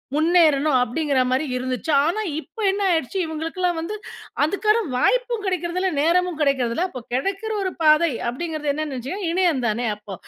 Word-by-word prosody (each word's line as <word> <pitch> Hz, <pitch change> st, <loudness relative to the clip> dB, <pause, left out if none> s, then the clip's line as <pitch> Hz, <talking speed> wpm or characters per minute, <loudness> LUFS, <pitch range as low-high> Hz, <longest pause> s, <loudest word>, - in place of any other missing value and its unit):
முன்னேறனும் 310 Hz, -3 st, +4 dB
அப்படிங்குற 280 Hz, +2 st, 0 dB
மாரி 260 Hz, +4 st, +1 dB
இருந்துச்சு. 255 Hz, +3 st, -3 dB, 0.2 s
ஆனா, 430 Hz, +6 st, 0 dB, 0.2 s
இப்ப 455 Hz, -, -24 dB
என்ன 405 Hz, -, -3 dB
ஆயிடுச்சு, 325 Hz, +2 st, -1 dB
இவுங்களுக்கெல்லாம் 320 Hz, +2 st, -5 dB
எல்லாம் 350 Hz, -2 st, +1 dB
வந்து, 350 Hz, +6 st, -4 dB, 0.5 s
அதுக்கான 425 Hz, +7 st, +1 dB
வாய்ப்பும் 485 Hz, -, +1 dB
கிடைக்கிறது 360 Hz, -1 st, -1 dB
இல்ல, 380 Hz, -, +2 dB
நேரமும் 350 Hz, +1 st, +1 dB
கிடைக்கிறதில்ல. 275 Hz, +3 st, +1 dB
அப்போ 255 Hz, -7 st, -8 dB
கிடைக்கிற 390 Hz, -, -2 dB
ஒரு 375 Hz, -, -1 dB
பாதை 310 Hz, +1 st, +5 dB, 0.2 s
அப்டிங்குறது 305 Hz, +2 st, -3 dB
என்னான்னு 305 Hz, -1 st, -3 dB
நெனைசீங்கன்னா, 335 Hz, -, -4 dB
இணையம் 340 Hz, -7 st, +1 dB
தானே! 230 Hz, +3 st, -1 dB
அப்போ 210 Hz, -1 st, -10 dB
320 Hz, 160 wpm, -22 LUFS, 275-365 Hz, 0.5 s, பாதை